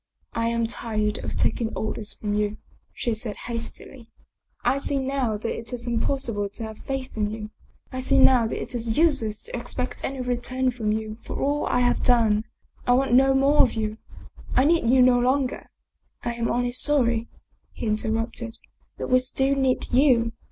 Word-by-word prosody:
" - - -43
I 230 0 0
am 230 0 +1
tired 215 -2 -2
of - - -4
taking 230 -2 0
orders 215 -1 -3
from 210 -1 -4
you," 210 0 0 0.3
she 235 - -2
said 220 -1 -4
hastily. 235 +1 -6 0.3
" - - -43
I 275 - -2
see 280 0 -1
now 265 -5 -1
that 225 +2 -3
it 230 0 -8
is 240 -1 -5
impossible 235 -3 -1
to 215 +3 -8
have 220 -1 -7
faith 270 -1 -5
in 210 -1 0
you; 215 0 -6 0.4
I 255 - -4
see 255 - +2
now 255 -4 +6
that - - -4
it - - -6
is 230 -2 -2
useless 255 -10 +2
to - - -5
expect 250 +1 -4
any 270 0 -3
return 255 +1 -1
from 225 -3 -2
you 215 0 -3
for - - -5
all 290 +2 0
I^have 245 0 +2
done. 225 -3 +3 0.4
I 245 - +5
want 260 -1 +2
no 270 +1 +5
more 275 +2 +5
of 245 - +3
you. 215 -1 -3 0.6
I 260 - +5
need 325 -6 +3
you 255 0 +6
no 250 -1 +5
longer." 260 +1 0 0.3
" - - -42
I 240 - -1
am 235 -1 -2
only 245 0 0
sorry/' 245 -3 +3 0.4
he - - -6
interrupted, 225 +2 -1 0.2
" - - -42
that - - -4
we 255 - +6
still 265 +1 +1
need 265 -2 +1
you. 245 -4 +4
240 Hz, 195 wpm, -25 LUFS, 220-260 Hz, 0.6 s, now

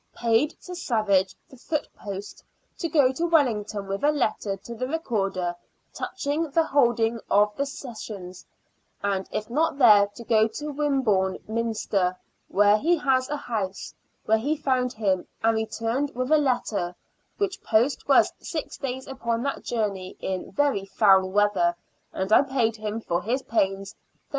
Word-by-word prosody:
Paid 235 +5 +1
to 360 - -8
Savage, 215 - +1
the 265 - -16
foot 300 +4 -3
post, 200 0 -8 0.4
to 335 - -2
go 285 -4 +4
to 335 +6 -1
Wellington 220 -10 +1
with 195 +4 -4
a 295 - +5
letter 215 -8 -1
to 220 +5 -9
the 255 +3 -3
Recorder 195 - -1 0.4
touching 300 +3 -2
the 325 +4 +3
holding 235 -6 +2
of 210 +1 +3
the 280 0 -1
Sessions, 215 -9 -8 0.6
and 195 -1 -1
if 215 - -3
not 300 +4 0
there 210 -6 +7
to 205 +3 -12
go 220 -1 +3
to 295 +7 -6
Wimborne 260 -10 +1
Minster, 215 -5 -1 0.3
where 205 +1 +4
he 340 +6 +2
has 260 -3 +1
a 295 - -2
house, 205 -8 -4 0.3
where 220 0 +3
he 295 +7 -1
found 255 -4 0
him, 195 -5 0 0.2
and 225 0 +3
returned 225 +5 -2
with 255 +3 -2
a 310 - +7
letter; 210 -10 -1 0.4
which 395 -1 -2
post 230 +5 +1
was - - +5
six 325 -4 -5
days 260 -1 -4
upon 235 -3 -2
that 275 - -2
journey 200 -5 -3
in 190 -1 -4
very 285 -9 +1
foul 195 -1 +4
weather, 200 -3 +2 0.4
and 190 +3 -1
I - - +8
paid 260 -5 0
him 215 +1 -4
for 175 -4 -1
his 250 +6 -1
pains 195 -2 -1
13s. - - -41
225 Hz, 160 wpm, -25 LUFS, 200-275 Hz, 0.6 s, I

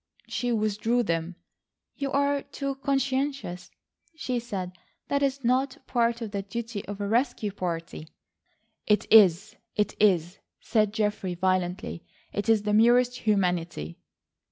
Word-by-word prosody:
She 245 -1 -2
withdrew 220 +2 +1
them. 165 -2 -2 0.6
"You 275 -1 -3
are 280 0 +2
too 275 0 -4
conscientious," 270 -6 -2 0.5
she 255 -6 -2
said. 195 -6 -5 0.4
"That 280 0 +1
is 275 -1 0
not 255 +2 +1
part 235 -1 +1
of 220 -3 -4
the 200 -1 -2
duty 220 +1 -5
of 205 0 -6
a 205 - -2
rescue 225 -2 0
party." 170 -4 -5 0.8
"It 210 -2 +3
is, 205 0 +6 0.2
it 210 -1 0
is," 180 -4 +2 0.2
said 215 -2 +1
Geoffrey 210 -4 -1
violently. 180 -1 -1 0.3
"It 205 +3 -2
is 220 -2 +4
the 210 0 0
merest 240 +3 +5
humanity." 180 - -1
215 Hz, 130 wpm, -27 LUFS, 185-250 Hz, 0.8 s, is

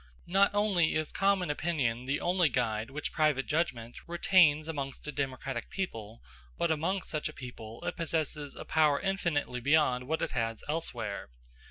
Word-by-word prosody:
Not 195 +3 +4
only 195 -6 +3
is 155 -1 -1
common 195 -4 +2
opinion 135 -7 -1
the 135 +2 0
only 175 -2 +2
guide 115 -3 -1
which 145 +2 -4
private 150 -4 +2
judgment 135 -8 -1
retains 170 -3 +4
amongst 140 -3 -5
a - - -2
democratic 135 -3 -3
people, 115 - -5 0.3
but 170 - +1
amongst 170 +5 -1
such 155 -2 -2
a - - -9
people 120 +1 -9
it 180 - -3
possesses 155 -3 -2
a - - -8
power 150 -3 +3
infinitely 170 -10 -1
beyond 130 -2 +3
what 160 +2 0
it - - -1
has 115 -1 -2
elsewhere. 115 - -3
150 Hz, 160 wpm, -31 LUFS, 125-170 Hz, 0.3 s, Not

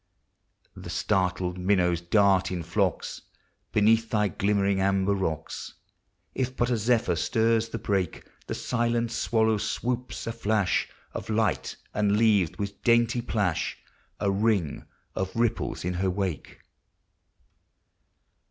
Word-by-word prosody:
The - - -9
startled 90 -1 0
minnows 90 -2 +2
dart 95 +1 +3
in 90 -2 -3
flocks 90 +2 -1 0.5
Beneath 110 +2 +3
thy 105 -2 +2
glimmering 100 -1 +1
amber 95 +1 +2
rocks, 90 -6 -3 0.6
If 130 0 -2
but 120 +1 +1
a 120 - +2
zephyr 110 -5 +2
stirs 115 +5 +1
the 115 - -4
brake; 95 -6 -2 0.2
The - - -3
silent 120 -1 0
swallow 110 -2 +1
swoops, 125 +4 -3
a 115 - -2
flash 105 -4 0 0.2
Of - - -6
light, 110 0 0 0.2
and 105 0 +2
leaves, 105 -7 +3
with 100 -1 -5
dainty 120 0 +3
plash, 105 -8 -1 0.4
A 100 - +1
ring 100 -6 0 0.3
of 95 0 -3
ripples 115 -6 -1
in 90 - -1
her 95 +2 0
wake. 90 -6 -3
105 Hz, 125 wpm, -27 LUFS, 95-115 Hz, 0.6 s, dart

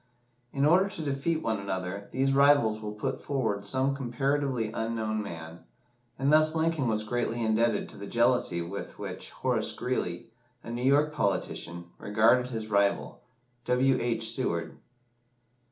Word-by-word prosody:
In 140 0 +1
order 185 +6 +4
to 165 -5 -5
defeat 150 +3 -1
one 110 -2 0
another, 100 0 -4
these 135 +2 +1
rivals 135 -6 +4
will 105 -1 -5
put 130 +5 -3
forward 110 -8 -1
some 130 +5 +1
comparatively 135 -2 -1
unknown 110 -1 -2
man, 80 -3 -7 0.6
and 135 +3 +2
thus 155 +1 +5
Lincoln 160 -4 +1
was 110 -1 0
greatly 120 +1 -1
indebted 115 +1 +1
to - - -10
the 100 0 -7
jealousy 120 -8 +2
with 95 +4 -7
which - - -6
Horace - - -1
Greeley, - - -3 0.3
a - - -7
New 120 +1 -4
York 145 +4 +3
politician, 85 - -2
regarded 115 +4 +3
his 110 -3 -5
rival, 100 +3 +1 0.4
W. 130 +2 +3
H. 115 -1 0
Seward. 85 -10 -2
120 Hz, 145 wpm, -28 LUFS, 105-135 Hz, 0.6 s, thus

